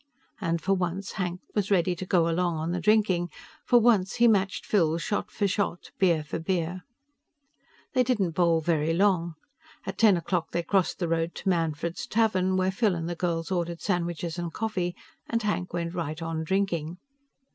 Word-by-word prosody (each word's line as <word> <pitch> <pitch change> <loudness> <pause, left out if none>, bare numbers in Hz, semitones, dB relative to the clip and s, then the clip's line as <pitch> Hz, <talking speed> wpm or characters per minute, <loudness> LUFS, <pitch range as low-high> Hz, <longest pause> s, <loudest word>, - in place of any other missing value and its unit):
And 170 -4 0
for 195 +4 +1
once, 185 +1 -2
Hank 180 -2 -3
was 205 -2 0
ready 180 -2 +2
to 185 +2 -6
go 170 -3 +3
along 170 0 0
on 160 +2 -2
the 180 - -1
drinking. 190 -3 +2 0.4
For 245 - +6
once, 215 -5 +3
he 240 0 +5
matched 195 -4 +1
Phil 165 -6 +2
shot 205 +4 -2
for 205 - 0
shot, 195 -3 -2
beer 170 -5 +3
for 150 - -4
beer. 175 +1 -2 1.1
They 255 - +4
didn't 215 -8 +1
bowl 165 -1 +2
very 160 0 +1
long. 175 -3 +2 0.5
At - - -5
ten 210 -5 +6
o'clock 170 0 -2
they 170 - 0
crossed 190 +1 +1
the 175 - -1
road 165 +1 -1
to - - -2
Manfred's 165 -1 -1
Tavern, 190 -4 +2
where 185 0 +2
Phil 200 -1 +1
and 165 -1 -3
the 175 - -2
girls 170 0 -2
ordered 170 -2 -2
sandwiches 175 -2 -2
and 170 -1 -3
coffee 185 -4 -2 0.3
and 230 -1 0
Hank 200 -3 -1
went 170 0 -3
right 160 -3 -3
on 165 -1 -3
drinking. 175 -2 -1
175 Hz, 180 wpm, -27 LUFS, 165-195 Hz, 1.1 s, For